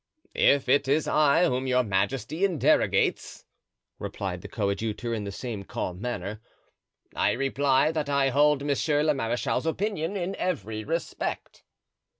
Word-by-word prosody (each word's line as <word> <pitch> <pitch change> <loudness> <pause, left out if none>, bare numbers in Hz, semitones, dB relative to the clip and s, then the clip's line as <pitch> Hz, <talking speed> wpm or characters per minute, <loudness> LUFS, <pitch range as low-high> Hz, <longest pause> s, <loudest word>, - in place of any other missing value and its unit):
"If 140 -1 +3
it 135 +1 +3
is 145 +3 +2
I 155 +2 +4
whom 130 -4 -1
your 125 0 +3
majesty 110 - -1
interrogates," 180 -6 +1 0.5
replied - - -4
the - - -8
coadjutor 110 +3 -2
in 105 -3 -3
the 100 - -4
same 110 0 -5
calm 90 -1 -5
manner, 105 -3 -4 0.7
"I - - +2
reply 135 +2 +2
that 155 -3 -2
I 140 -1 +2
hold 145 +1 +3
monsieur 145 +1 +1
le 155 -1 +3
marechal's 120 +4 -1
opinion 195 +1 -2
in 185 +1 -3
every 110 - -3
respect." 165 +5 -4
135 Hz, 140 wpm, -27 LUFS, 115-155 Hz, 0.7 s, I